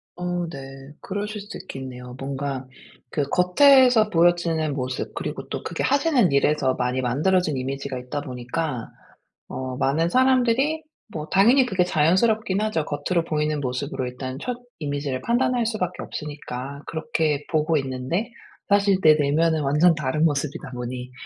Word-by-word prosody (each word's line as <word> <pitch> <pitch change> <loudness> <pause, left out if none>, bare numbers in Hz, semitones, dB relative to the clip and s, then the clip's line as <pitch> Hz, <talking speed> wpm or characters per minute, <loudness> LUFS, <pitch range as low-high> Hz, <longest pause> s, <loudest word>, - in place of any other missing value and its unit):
어 175 0 -2
네. 135 -1 -10
그러실 205 +2 -4
수도 205 - -8
있겠네요. 125 -5 -8
뭔가 135 -1 -4 0.4
그 150 - -1
겉에서 245 +4 +5
보여지는 165 -3 +2
모습 130 0 -3
그리고 - - -5
또 - - -4
그게 - - -4
하시는 275 - +3
일에서 140 -1 +2
많이 125 +1 -1
만들어진 155 +5 +1
이미지가 135 +1 -4
있다 125 +3 -4
보니까 125 0 -4 0.6
어 130 -1 -5
많은 160 +7 +1
사람들이 260 - +2 0.3
뭐 155 -1 -5
당연히 240 +7 +5
그게 190 -5 +2
자연스럽긴 190 +6 +2
하죠. 215 -8 0
겉으로 160 +4 -1
보이는 150 -2 -1
모습으로 130 +1 -3
일단 130 +1 -6
첫 250 -1 -3 0.2
이미지를 145 -3 -3
판단할 240 0 +1
수 220 -1 -2
밖에 180 -2 -3
없으니까 140 -2 -6
그렇게 160 -4 -1
보고 155 0 +2
있는데 135 - -2 0.4
사실 200 -1 +4
내 155 - +8
내면은 155 +2 +2
완전 150 +5 +4
다른 150 +1 0
모습이다 145 -2 -2
보니 125 0 -6
155 Hz, 340 characters per minute, -24 LUFS, 135-190 Hz, 0.6 s, 내